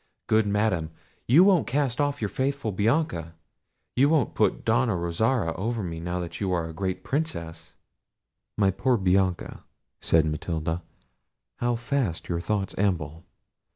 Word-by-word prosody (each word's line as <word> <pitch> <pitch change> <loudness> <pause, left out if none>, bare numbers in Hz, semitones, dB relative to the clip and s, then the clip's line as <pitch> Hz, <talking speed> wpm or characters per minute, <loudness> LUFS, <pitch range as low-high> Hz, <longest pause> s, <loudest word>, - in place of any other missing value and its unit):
—Good 110 -1 +3
madam, 100 -6 +1 0.4
you 150 +10 +7
won't 190 -5 +4
cast 135 0 0
off 145 -4 -1
your 105 - 0
faithful 135 -2 -1
Bianca: 100 - 0 0.6
you 140 +3 +4
won't 150 -8 +2
put - - +1
Donna 115 -1 +2
Rosara 85 +3 0
over 110 +3 -2
me 85 -2 -4
now 90 +1 -3
you 95 -2 -1
are 85 -2 0
a 80 - -8
great 95 +2 -3
Princess." 110 - -4 0.8
"My 100 -2 +3
poor 125 +6 +1
Bianca," 95 -2 0 0.4
said 80 -1 +3
Matilda, 80 +2 -2 0.8
"how 120 0 +1
fast 115 - -2
your 85 -1 0
thoughts 100 +1 -2
amble! 85 -5 -1
100 Hz, 140 wpm, -26 LUFS, 85-125 Hz, 0.8 s, you